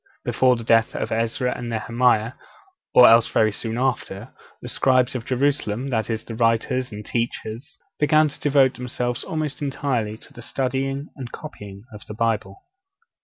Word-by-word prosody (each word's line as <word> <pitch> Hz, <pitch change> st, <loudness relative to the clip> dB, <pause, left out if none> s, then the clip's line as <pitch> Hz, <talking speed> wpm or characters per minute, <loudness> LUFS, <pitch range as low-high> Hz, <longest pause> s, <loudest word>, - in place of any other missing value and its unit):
Before 130 Hz, -1 st, +3 dB
the 115 Hz, -, -6 dB
death 115 Hz, 0 st, +3 dB
of -, -, -3 dB
Ezra 115 Hz, +3 st, -1 dB
and 120 Hz, -, -5 dB
Nehemiah, 115 Hz, 0 st, +1 dB, 0.6 s
or 125 Hz, -, +8 dB
else 115 Hz, 0 st, +6 dB
very 110 Hz, -1 st, +2 dB
soon 115 Hz, +2 st, -4 dB
after, 120 Hz, -4 st, -2 dB, 0.3 s
the -, -, -9 dB
scribes 130 Hz, -2 st, +2 dB
of 120 Hz, -3 st, -5 dB
Jerusalem 130 Hz, -2 st, -1 dB
that 110 Hz, -3 st, -1 dB
is, 110 Hz, -1 st, -2 dB
the 115 Hz, -, -8 dB
writers 115 Hz, +2 st, 0 dB
and 105 Hz, 0 st, -8 dB
teachers 120 Hz, +4 st, -4 dB, 0.2 s
began 155 Hz, +1 st, +4 dB
to -, -, -11 dB
devote 140 Hz, -3 st, +3 dB
themselves 125 Hz, -1 st, -3 dB
almost 155 Hz, -2 st, -4 dB
entirely 130 Hz, -6 st, -2 dB
to -, -, -18 dB
the 120 Hz, -, -11 dB
studying 135 Hz, +3 st, -2 dB
and 125 Hz, -4 st, -8 dB
copying 105 Hz, -10 st, -10 dB
of 105 Hz, -, -10 dB
the 105 Hz, -, -7 dB
Bible. 115 Hz, -, -2 dB
120 Hz, 165 wpm, -23 LUFS, 115-135 Hz, 0.6 s, or